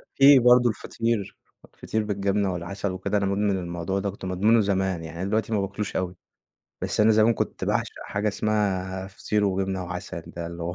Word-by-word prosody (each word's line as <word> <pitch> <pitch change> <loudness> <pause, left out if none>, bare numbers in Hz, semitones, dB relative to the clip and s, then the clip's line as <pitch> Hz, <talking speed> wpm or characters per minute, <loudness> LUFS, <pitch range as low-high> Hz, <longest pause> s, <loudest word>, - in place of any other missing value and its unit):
في 135 0 +8
برضه 125 0 +6
الفطير، 115 -2 -2 0.4
الفطير 110 -1 -2
بالجبنة 100 -1 0
والعسل 95 +3 -4
وكده، 95 +3 -1
أنا 100 - 0
مدمن 100 +1 +1
الموضوع 85 +2 -3
ده 100 +1 -2
كنت 95 0 -8
مدمنه 105 +5 +3
زمان 95 -4 0
يعني، 80 +1 -8
أنا 95 - -2
دلوقتي 110 +1 0
ما 105 - +2
باكلوش 100 +1 -4
أوي. 90 0 -2 0.7
بس - - -1
أنا 110 +1 +6
زمان 110 +2 +4
كنت - - -3
باعشق - - 0
حاجة 105 +1 -1
اسمها 95 -3 -1
فطير 105 +2 -1
وجبنة 95 -1 -1
وعسل 90 0 -6
ده 85 -1 -6
اللي 85 0 -7
هو 85 +1 -3
100 Hz, 185 wpm, -25 LUFS, 95-105 Hz, 0.7 s, في